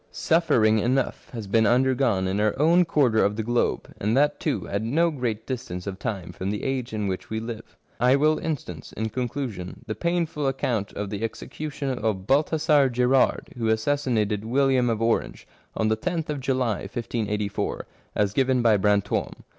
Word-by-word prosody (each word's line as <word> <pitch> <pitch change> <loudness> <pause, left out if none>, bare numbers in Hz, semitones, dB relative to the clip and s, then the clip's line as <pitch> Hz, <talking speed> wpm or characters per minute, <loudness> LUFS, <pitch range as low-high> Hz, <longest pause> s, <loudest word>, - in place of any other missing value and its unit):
Suffering 110 -10 +3
enough 125 +4 -1
has 115 -4 -6
been 110 +2 +3
under 130 +3 +3
gone 115 -8 +1
in 95 +2 -1
our 105 +2 +1
own 170 +4 +5
quarter 130 -9 +3
of 100 +1 +1
the 110 - -2
globe, 120 +2 -1
and 110 +5 +1
that 145 +1 +2
too 150 - -2
at 100 +1 -2
no 160 +10 +2
great 115 -6 -3
distance 90 -9 -5
of 95 -1 -5
time 95 -5 -4
from 95 +2 -4
the 105 0 -3
age 130 -2 -2
in 105 -2 -2
which 95 -1 -4
we 110 - -2
live. 115 0 -8 0.2
I 125 +2 +5
will 155 +2 +3
instance, 130 - -5
in 110 +1 -2
conclusion, 120 -5 -4
the 110 - -3
painful 170 -2 -1
account 120 -6 -1
of 100 0 -4
the 105 +1 -4
execution 135 +3 -4
of 105 -4 -1
Balthazar 150 - +3
Gerard, 125 +2 +2
who 115 - 0
assassin 125 +3 +1
ated 105 -1 0
William 130 +1 +2
of 115 -1 0
Orange, 115 0 -1 0.3
on 110 - +1
the 110 0 0
loth 165 -4 -1
of 145 - -3
July 130 -5 0
1584, 105 -1 -3 0.3
as 100 -1 +1
given 130 -1 +2
by 110 -3 +5
Brant6me. 105 0 +1
120 Hz, 180 wpm, -25 LUFS, 105-135 Hz, 0.3 s, own